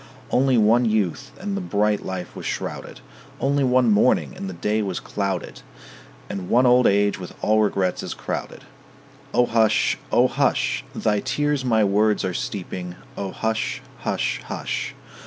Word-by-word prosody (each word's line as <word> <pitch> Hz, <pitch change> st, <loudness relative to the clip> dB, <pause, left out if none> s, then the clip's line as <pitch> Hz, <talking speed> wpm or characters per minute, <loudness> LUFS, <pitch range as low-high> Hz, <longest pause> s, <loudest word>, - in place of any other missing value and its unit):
Only 130 Hz, 0 st, +3 dB
one 115 Hz, +3 st, +4 dB
youth, 110 Hz, +5 st, 0 dB
and 200 Hz, +1 st, -3 dB
the 200 Hz, -, -2 dB
bright 105 Hz, -, +1 dB
life 95 Hz, -1 st, -5 dB
was -, -, -6 dB
shrouded; -, -, -5 dB, 0.4 s
Only 140 Hz, +2 st, +1 dB
one 125 Hz, -2 st, +4 dB
morning, 105 Hz, -, +3 dB
and 95 Hz, -, -5 dB
the 95 Hz, -, -7 dB
day 105 Hz, +5 st, 0 dB
was 95 Hz, -4 st, -2 dB
clouded; 100 Hz, -3 st, -3 dB, 0.7 s
And 95 Hz, -2 st, -5 dB
one 125 Hz, +2 st, +4 dB
old 125 Hz, 0 st, +6 dB
age 100 Hz, 0 st, +2 dB
with 90 Hz, -, -8 dB
all 110 Hz, 0 st, +4 dB
regrets 95 Hz, -3 st, 0 dB
is -, -, -5 dB
crowded. -, -, -5 dB, 0.7 s
O 125 Hz, -1 st, +4 dB
hush, 115 Hz, -2 st, +2 dB
O -, -, +5 dB
hush! -, -, +1 dB
Thy 105 Hz, -1 st, +1 dB
tears 145 Hz, +3 st, 0 dB
my 110 Hz, -4 st, +3 dB
words 105 Hz, +1 st, +2 dB
are 95 Hz, -, -2 dB
steeping. 90 Hz, -2 st, -5 dB, 0.2 s
O 100 Hz, -1 st, -3 dB
hush, 110 Hz, 0 st, -2 dB, 0.2 s
hush, -, -, -1 dB
hush! -, -, -3 dB
105 Hz, 155 wpm, -23 LUFS, 100-125 Hz, 0.7 s, old